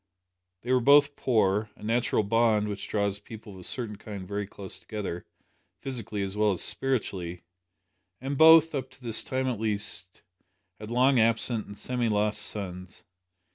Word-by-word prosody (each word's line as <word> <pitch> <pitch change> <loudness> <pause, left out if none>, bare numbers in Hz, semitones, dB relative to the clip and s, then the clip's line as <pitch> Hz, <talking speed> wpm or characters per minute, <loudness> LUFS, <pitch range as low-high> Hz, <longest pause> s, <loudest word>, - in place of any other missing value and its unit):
They 120 - -3
were 130 - +4
both 145 +2 +5
poor 105 -3 +1
a - - -16
natural 115 0 +1
bond 110 0 +2
which 105 -1 -5
draws 100 -1 -1
people 105 0 -11
of 95 - -12
a - - -11
certain 110 0 -1
kind 100 -3 -8
very 100 0 -3
close 95 -1 -8
together, 100 -5 -6 0.5
physically 115 -6 -3
as 95 0 -4
well 105 -1 +2
as 90 - 0
spiritually 95 -10 -1 0.8
and 135 +2 -3
both, 160 +1 +7
up 130 -2 -3
to 130 0 -19
this 115 -2 +1
time 130 0 -2
at 125 -5 -2
least, 105 -3 -2 0.6
had 105 0 -8
long 125 +2 +3
absent 115 0 +1
and 100 - -10
semi 125 -2 -1
lost 105 0 0
sons. 90 -3 -6
110 Hz, 165 wpm, -27 LUFS, 100-125 Hz, 0.8 s, both